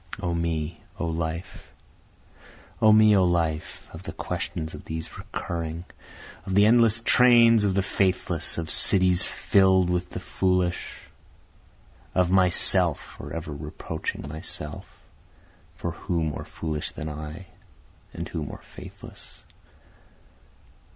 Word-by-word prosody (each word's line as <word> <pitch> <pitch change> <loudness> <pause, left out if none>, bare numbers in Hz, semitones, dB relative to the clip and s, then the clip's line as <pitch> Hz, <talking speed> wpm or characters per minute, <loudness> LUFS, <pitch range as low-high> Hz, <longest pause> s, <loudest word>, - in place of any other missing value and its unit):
O 90 -3 -2
Me! 80 -1 -3 0.2
O - - -1
Life! 80 +1 -5 1.1
O 110 - +6
me! 110 -1 +6
O 95 - +4
life! 85 -3 -1
of 80 - -9
the 95 - -6
questions 80 -1 -5
of 75 - -9
these 80 0 -7
recurring, 85 0 -5 0.6
Of 95 - -3
the 100 +1 +6
endless 115 0 +4
trains 115 -3 +5
of 95 -2 0
the 95 - +1
faithless, 90 -3 0
of 80 -2 -4
cities 90 -2 +5
fill'd 95 -2 +3
with 90 0 -2
the - - -6
foolish, 90 -2 -1 1.1
Of 90 -1 +2
myself 90 -2 +4
forever 75 +2 -8
reproaching 75 -1 -6
myself, 75 0 -4 0.9
(for 85 - -4
who 85 0 -3
more 75 -2 -4
foolish 75 -2 -4
than 75 - -7
I, 75 +4 -7 0.7
and 85 - -6
who 85 - -5
more 75 - -9
faithless?) - - -12
85 Hz, 120 wpm, -25 LUFS, 80-95 Hz, 1.1 s, O